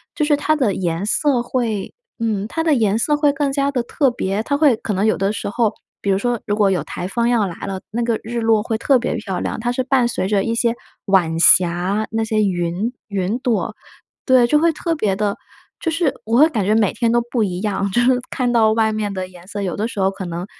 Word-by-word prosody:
就 300 Hz, -, +1 dB
是 295 Hz, -1 st, +3 dB
它 310 Hz, +2 st, +1 dB
的 230 Hz, -9 st, +1 dB
颜 175 Hz, +1 st, -2 dB
色 250 Hz, +3 st, +1 dB
会 235 Hz, -5 st, -2 dB, 0.3 s
嗯， 215 Hz, -3 st, -1 dB
它 325 Hz, -, -2 dB
的 320 Hz, -2 st, +3 dB
颜 220 Hz, -3 st, +2 dB
色 295 Hz, +5 st, +2 dB
会 295 Hz, -1 st, +3 dB
更 280 Hz, 0 st, -1 dB
加 280 Hz, 0 st, +1 dB
地 250 Hz, -3 st, 0 dB
特 270 Hz, +1 st, +1 dB
别， 205 Hz, -2 st, -2 dB
它 285 Hz, +3 st, 0 dB
会 290 Hz, -5 st, +4 dB
可 215 Hz, -, -5 dB
能 195 Hz, +3 st, 0 dB
有 220 Hz, -, +3 dB
的 195 Hz, +2 st, 0 dB
时 215 Hz, -, -4 dB
候， 225 Hz, 0 st, +1 dB, 0.3 s
比 200 Hz, -, -2 dB
如 190 Hz, -, +2 dB
说 240 Hz, +1 st, -1 dB
如 205 Hz, -, 0 dB
果 205 Hz, -2 st, +3 dB
有 175 Hz, -6 st, 0 dB
台 180 Hz, -, -5 dB
风 235 Hz, +4 st, 0 dB
要 225 Hz, -5 st, +2 dB
来 170 Hz, -, -7 dB
了， 190 Hz, -1 st, -4 dB
那 235 Hz, +2 st, -1 dB
个 230 Hz, -2 st, 0 dB
日 235 Hz, +2 st, -4 dB
落 225 Hz, -1 st, +3 dB
会 225 Hz, -1 st, -2 dB
特 255 Hz, +3 st, +3 dB
别 240 Hz, -, -2 dB
漂 210 Hz, -5 st, -4 dB
亮， -, -, -3 dB
它 240 Hz, +1 st, -1 dB
是 255 Hz, +1 st, -1 dB
伴 255 Hz, -2 st, +2 dB
随 190 Hz, -, -2 dB
着 200 Hz, -1 st, +1 dB
一 230 Hz, -, -1 dB
些 235 Hz, 0 st, +1 dB, 0.3 s
晚 175 Hz, -5 st, +2 dB
霞， 180 Hz, +5 st, +3 dB
那 225 Hz, 0 st, 0 dB
些 215 Hz, -1 st, +1 dB
云 180 Hz, +5 st, -1 dB
云 200 Hz, +2 st, -1 dB
朵。 245 Hz, -4 st, -1 dB, 0.5 s
对， 255 Hz, -2 st, +5 dB
就 300 Hz, -, +3 dB
会 335 Hz, +1 st, +3 dB
特 330 Hz, +2 st, -2 dB
别 210 Hz, -9 st, 0 dB
的 205 Hz, 0 st, -1 dB, 0.4 s
就 330 Hz, -, -1 dB
是 325 Hz, -4 st, 0 dB
我 225 Hz, +2 st, +1 dB
会 305 Hz, +3 st, +7 dB
感 220 Hz, -9 st, -1 dB
觉 210 Hz, +3 st, +2 dB
每 215 Hz, -4 st, +2 dB
天 230 Hz, -2 st, 0 dB
都 240 Hz, -, +3 dB
不 235 Hz, -4 st, +1 dB
一 180 Hz, -1 st, -3 dB
样， 200 Hz, -2 st, -1 dB
就 240 Hz, -, +1 dB
是 250 Hz, 0 st, +3 dB
看 250 Hz, -2 st, -1 dB
到 220 Hz, -2 st, +4 dB
外 220 Hz, -1 st, +1 dB
面 210 Hz, -2 st, -2 dB
的 185 Hz, -1 st, -4 dB
颜 180 Hz, -1 st, -15 dB
色， 205 Hz, 0 st, -5 dB
有 185 Hz, -, -2 dB
的 215 Hz, +3 st, -1 dB
时 210 Hz, -, -7 dB
候 190 Hz, 0 st, +2 dB
可 195 Hz, -1 st, -7 dB
能 175 Hz, +1 st, -5 dB
220 Hz, 270 characters per minute, -19 LUFS, 195-245 Hz, 0.5 s, 会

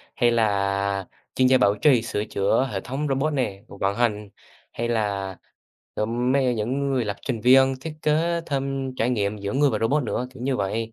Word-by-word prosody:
hay 120 Hz, -1 st, +3 dB
là 100 Hz, -3 st, 0 dB, 0.3 s
chuyên 130 Hz, -1 st, +4 dB
gia 130 Hz, 0 st, +5 dB
bảo 100 Hz, -2 st, +3 dB
trì, 125 Hz, +1 st, +4 dB
sửa 105 Hz, -2 st, -3 dB
chữa 100 Hz, +7 st, +1 dB
hệ 95 Hz, -, -2 dB
thống 140 Hz, +4 st, -3 dB
robot 140 Hz, +3 st, 0 dB
nè, 100 Hz, -8 st, -2 dB
vận 100 Hz, 0 st, -2 dB
hành, 105 Hz, -4 st, 0 dB, 0.4 s
hay 120 Hz, +1 st, -3 dB
là, 100 Hz, -4 st, -1 dB, 0.6 s
ừm, 120 Hz, +4 st, 0 dB
mấy 135 Hz, -1 st, +2 dB
ấy 125 Hz, -1 st, +1 dB
những 130 Hz, +6 st, -1 dB
người 130 Hz, -3 st, +1 dB
lập 100 Hz, -1 st, -3 dB
trình 120 Hz, -5 st, -2 dB
viên, 130 Hz, +2 st, +5 dB
thiết 160 Hz, +2 st, -6 dB
kế 165 Hz, +3 st, +1 dB
thêm 135 Hz, -2 st, -2 dB
trải 115 Hz, +3 st, +1 dB
nghiệm 105 Hz, -3 st, -1 dB
giữa 100 Hz, 0 st, -4 dB
người 140 Hz, 0 st, +3 dB
và -, -, -1 dB
robot 135 Hz, +6 st, +1 dB
nữa, 125 Hz, +1 st, -2 dB
kiểu 125 Hz, -, -9 dB
như 130 Hz, -1 st, 0 dB
vậy. 110 Hz, +3 st, -2 dB
120 Hz, 205 wpm, -24 LUFS, 105-135 Hz, 0.6 s, gia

